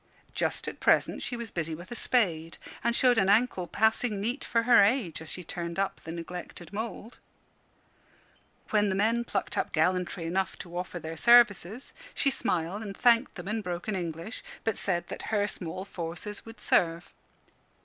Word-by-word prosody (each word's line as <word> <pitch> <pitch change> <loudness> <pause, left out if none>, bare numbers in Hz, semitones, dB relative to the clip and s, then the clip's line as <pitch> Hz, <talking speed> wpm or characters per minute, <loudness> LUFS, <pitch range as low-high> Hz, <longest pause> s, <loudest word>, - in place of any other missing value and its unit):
Just - - -1
at - - -5
present - - +3
she 245 - -3
was 235 -2 -6
busy 165 -2 -2
with 175 +6 -11
a - - -4
spade, 170 -11 +1 0.3
and 235 0 +2
showed 245 -2 +5
an 190 -1 +3
ankle 205 -4 +3
passing 220 0 +1
neat 240 +7 -2
for 230 -1 +1
her 235 -3 +7
age, 200 - +1
as 160 - -8
she 180 - -5
turned 170 0 -5
up 195 0 -1
the 165 - -7
neglected 170 +1 -7
mould. 225 +2 -6 1.5
When 210 -1 +3
the 190 - 0
men 225 +4 +2
plucked 200 -4 -2
up - - -1
gallantry 180 +2 0
enough 185 +3 -1
to 175 -1 -9
offer 180 0 -4
their 165 -1 -6
services, 235 - +4 0.2
she 275 - +3
smiled 180 -3 -1
and 200 -3 -7
thanked 240 0 +4
them 180 -2 -8
in 220 +2 -1
broken 180 +2 -3
English, 170 +4 -5 0.2
but 225 - 0
said 175 -3 -1
that - - -6
her 205 -2 +2
small 185 -2 -4
forces 180 +4 -6
would 225 0 -11
serve. 170 0 +1
195 Hz, 175 wpm, -29 LUFS, 175-225 Hz, 1.5 s, her